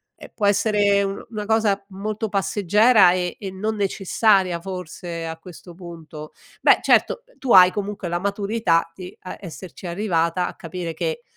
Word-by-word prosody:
ehm, -, -, -13 dB
può 210 Hz, -, -1 dB
essere 205 Hz, -1 st, +3 dB
un 195 Hz, 0 st, -4 dB
una 210 Hz, -2 st, -5 dB
cosa 215 Hz, -3 st, +1 dB
molto 210 Hz, +3 st, -4 dB
passeggera 205 Hz, 0 st, +4 dB
e 180 Hz, -1 st, -2 dB
e 195 Hz, -, -5 dB
non 215 Hz, +4 st, -3 dB
necessaria 195 Hz, -2 st, +1 dB
forse 175 Hz, -2 st, -6 dB
a 160 Hz, 0 st, -6 dB
questo 175 Hz, 0 st, -13 dB
punto. 165 Hz, -3 st, -10 dB, 0.3 s
Beh, -, -, +5 dB
certo, -, -, +2 dB, 0.2 s
tu 260 Hz, -, -2 dB
hai 180 Hz, -1 st, +8 dB
comunque 205 Hz, -3 st, -4 dB
la 175 Hz, 0 st, -1 dB
maturità 200 Hz, -4 st, 0 dB
di 180 Hz, 0 st, -10 dB
a 185 Hz, -, -8 dB
esserci 180 Hz, 0 st, -9 dB
arrivata 175 Hz, -2 st, 0 dB
a -, -, -7 dB
capire 165 Hz, 0 st, -6 dB
che 170 Hz, +8 st, -3 dB
190 Hz, 160 wpm, -22 LUFS, 175-205 Hz, 0.3 s, hai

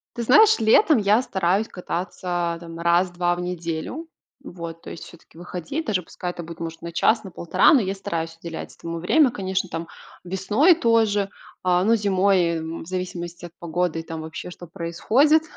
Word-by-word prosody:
Ты 235 Hz, -, -3 dB
знаешь, 415 Hz, -, +6 dB
летом 245 Hz, -, +5 dB
я 210 Hz, +2 st, +3 dB
стараюсь 195 Hz, -2 st, 0 dB
кататься, 180 Hz, +1 st, -5 dB, 0.3 s
а 165 Hz, -, -10 dB
там 165 Hz, -1 st, -9 dB
1-2 175 Hz, +1 st, +2 dB
в -, -, -7 dB
неделю. 175 Hz, -, -4 dB, 0.4 s
Вот, 170 Hz, -7 st, -8 dB
то -, -, -10 dB
есть -, -, -8 dB
всё-таки 165 Hz, -1 st, -17 dB
выходить. 180 Hz, -, -5 dB
Даже 195 Hz, -4 st, 0 dB
пускай 175 Hz, +1 st, -6 dB
это 175 Hz, -, -8 dB
будет, 165 Hz, 0 st, -10 dB
может, 165 Hz, -1 st, -6 dB
на 170 Hz, -, -6 dB
час, 220 Hz, +7 st, +2 dB
на 190 Hz, -, -9 dB
полтора, 170 Hz, -, +3 dB
но 275 Hz, -, +6 dB
я 190 Hz, -1 st, -2 dB
стараюсь 165 Hz, -4 st, -4 dB
уделять 165 Hz, -1 st, -7 dB
этому 165 Hz, 0 st, -6 dB
время. 280 Hz, -, +4 dB
Конечно, 190 Hz, -3 st, -2 dB
там 165 Hz, 0 st, -5 dB, 0.4 s
весной 205 Hz, -, +3 dB
тоже, 220 Hz, -, +2 dB, 0.3 s
э, 180 Hz, -1 st, +3 dB
ну, 230 Hz, -, +5 dB
зимой, 190 Hz, -4 st, +2 dB
м, 160 Hz, +1 st, -5 dB
в 160 Hz, -, -14 dB
зависимости 175 Hz, -2 st, -5 dB
от 175 Hz, -, -10 dB
погоды 170 Hz, 0 st, -1 dB
и -, -, -6 dB
там 160 Hz, -1 st, -6 dB
вообще, 160 Hz, +3 st, -7 dB
что 175 Hz, -, -10 dB
происходит, 220 Hz, -, +2 dB
180 Hz, 185 wpm, -23 LUFS, 170-210 Hz, 0.4 s, знаешь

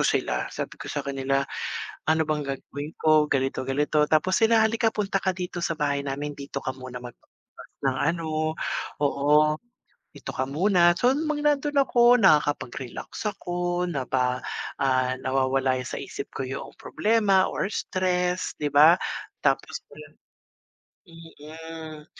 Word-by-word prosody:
sila. -, -, 0 dB
Sabi -, -, -5 dB
ko -, -, -7 dB
sa 145 Hz, -1 st, -3 dB
kanila, 135 Hz, 0 st, 0 dB, 0.6 s
"ano 160 Hz, 0 st, +3 dB
bang 150 Hz, -1 st, -1 dB, 0.2 s
gagawin 145 Hz, +4 st, -8 dB
ko?" 155 Hz, -1 st, +4 dB
Ganito 135 Hz, 0 st, -1 dB
ganito 150 Hz, +2 st, +2 dB
tapos 160 Hz, +4 st, +2 dB
sila, 225 Hz, 0 st, +5 dB
"halika 225 Hz, +1 st, +2 dB
dito, -, -, -7 dB
punta 195 Hz, -2 st, 0 dB
ka 190 Hz, -1 st, -1 dB
dito 180 Hz, -1 st, -4 dB
sa 165 Hz, -1 st, -1 dB
bahay 140 Hz, -2 st, 0 dB
namin, 140 Hz, +1 st, -4 dB
dito 140 Hz, -1 st, -6 dB
ka 130 Hz, -, -1 dB
muna 130 Hz, -1 st, -8 dB
magpalipas 120 Hz, -, -14 dB, 0.4 s
ng 130 Hz, -1 st, +1 dB
ano. 165 Hz, +1 st, 0 dB, 0.8 s
Oo, 150 Hz, +2 st, +3 dB, 0.6 s
dito -, -, -7 dB
ka 130 Hz, 0 st, -2 dB
muna" 175 Hz, +3 st, +4 dB
So, 245 Hz, +7 st, +3 dB
nung 305 Hz, +3 st, -1 dB
mang 295 Hz, -1 st, -1 dB
nandun 295 Hz, 0 st, +1 dB
ako, 240 Hz, -1 st, +5 dB
nakakapag-relax 145 Hz, -, +1 dB
ako 175 Hz, -2 st, -2 dB
napa 125 Hz, -2 st, 0 dB, 0.4 s
ah, 130 Hz, -1 st, +2 dB
nawawala 130 Hz, 0 st, +1 dB
sa -, -, -5 dB
isip -, -, -7 dB
ko 130 Hz, -, -4 dB
yung 135 Hz, -, -6 dB
problema 210 Hz, -4 st, +2 dB
or -, -, -1 dB
stress 180 Hz, -2 st, -1 dB
'di 145 Hz, -2 st, -2 dB
ba? 155 Hz, +4 st, +8 dB, 0.5 s
Tapos -, -, +1 dB, 1.3 s
Mhm, 160 Hz, -1 st, -11 dB
155 Hz, 140 wpm, -25 LUFS, 135-180 Hz, 1.3 s, ba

